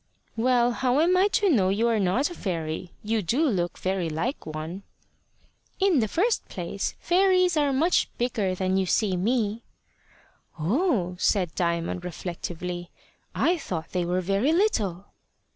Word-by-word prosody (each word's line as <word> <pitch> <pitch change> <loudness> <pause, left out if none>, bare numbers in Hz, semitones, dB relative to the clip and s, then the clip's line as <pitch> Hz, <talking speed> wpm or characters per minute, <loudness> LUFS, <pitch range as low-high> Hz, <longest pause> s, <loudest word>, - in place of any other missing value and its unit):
"Well, 240 +1 +3
how 250 +2 +1
am 345 +4 +4
I 375 +2 +4
to 410 0 +1
know 195 -9 +3
you 215 +4 +1
are 230 -2 +2
not 205 - +1
a - - -5
fairy? 170 - -4
You 220 +1 0
do 255 - +1
look 175 -8 -1
very 185 -3 -1
like 165 - -3
one." 155 +4 -5 1.0
"In 380 -7 +3
the 220 - +1
first 415 - 0
place, - - -4
fairies 365 -1 +3
are 290 -2 +2
much 320 +7 +2
bigger 220 -6 0
than 185 0 0
you 190 -1 +1
see 195 0 +1
me." 220 +3 0 1.0
"Oh!" 185 - 0
said 180 -6 +1
Diamond 170 +1 -1
reflectively; 175 0 -5 0.5
"I 350 0 +2
thought 165 - -5
they 180 -1 0
were 180 +2 0
very 195 - +1
little." 215 - +1
205 Hz, 150 wpm, -26 LUFS, 180-280 Hz, 1.0 s, am